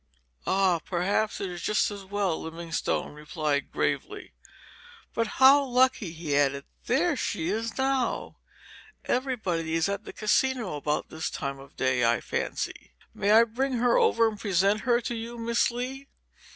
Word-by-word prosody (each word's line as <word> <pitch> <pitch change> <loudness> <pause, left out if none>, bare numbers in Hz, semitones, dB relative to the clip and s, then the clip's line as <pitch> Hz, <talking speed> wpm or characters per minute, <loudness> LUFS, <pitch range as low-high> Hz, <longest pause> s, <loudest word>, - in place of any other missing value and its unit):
"Ah, 190 -3 +3
perhaps 190 +6 -1
it 190 -2 -3
is 175 -1 -7
just 210 +2 +1
as 200 -1 -7
well," 195 -3 -1
Livingstone 165 -1 -3
replied, 150 -1 -2
gravely. - - -2 0.8
"But 230 -1 0
how 275 +2 +7
lucky!" 250 -7 +2
he 160 -3 -3
added; 140 -1 +1 0.2
"there 310 +6 +2
she 175 -8 -2
is 225 +3 -2
now. 265 -2 -1 0.7
Everybody 190 -11 -1
is 165 +1 +2
at 200 +1 -3
the - - -7
Casino 225 - +1
about 150 +1 -2
this 160 0 -3
time 140 0 -4
of 135 0 -14
day, 130 -1 +1
I 115 0 +3
fancy. - - -4 0.2
May 200 - -1
I 220 +2 +8
bring 255 +4 -2
her 245 0 +2
over 230 0 +4
and 215 -2 -4
present 200 +1 +2
her 240 -1 +2
to 240 - -3
you, 230 +1 -6
Miss 235 +1 +1
Lee?" 255 +3 -5
205 Hz, 155 wpm, -27 LUFS, 165-240 Hz, 0.8 s, I